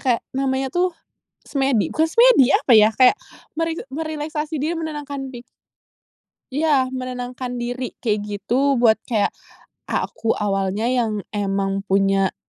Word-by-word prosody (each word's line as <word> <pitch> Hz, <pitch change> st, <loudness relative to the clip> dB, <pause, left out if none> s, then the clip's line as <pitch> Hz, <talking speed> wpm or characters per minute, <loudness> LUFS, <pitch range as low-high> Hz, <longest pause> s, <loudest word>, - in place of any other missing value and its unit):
kayak 245 Hz, -3 st, +2 dB
namanya 265 Hz, 0 st, 0 dB
tuh, 360 Hz, +1 st, +2 dB, 0.6 s
semedi 270 Hz, -6 st, +1 dB
bukan 315 Hz, -, +2 dB
semedi 465 Hz, -, +6 dB
apa 250 Hz, -, +3 dB
yah, 215 Hz, 0 st, +6 dB
kayak 255 Hz, -, +6 dB, 0.4 s
meri 330 Hz, 0 st, -1 dB, 0.2 s
merileksasi 310 Hz, +1 st, -4 dB
diri 315 Hz, +4 st, 0 dB
menenangkan 290 Hz, -4 st, -5 dB
pik 240 Hz, -, -8 dB, 1.1 s
Iya, 280 Hz, -3 st, +2 dB
menenangkan 250 Hz, -1 st, -5 dB
diri 245 Hz, +1 st, -4 dB
kayak 215 Hz, -3 st, -1 dB
gitu. 240 Hz, +8 st, 0 dB
Buat 225 Hz, -2 st, +4 dB
kayak, 215 Hz, -4 st, +1 dB, 0.5 s
"Ah, -, -, -1 dB
aku 225 Hz, -, -1 dB
awalnya 200 Hz, +2 st, -1 dB
yang 225 Hz, -5 st, 0 dB
emang 195 Hz, -1 st, -2 dB
punya 195 Hz, 0 st, +2 dB
255 Hz, 130 wpm, -21 LUFS, 215-290 Hz, 1.1 s, semedi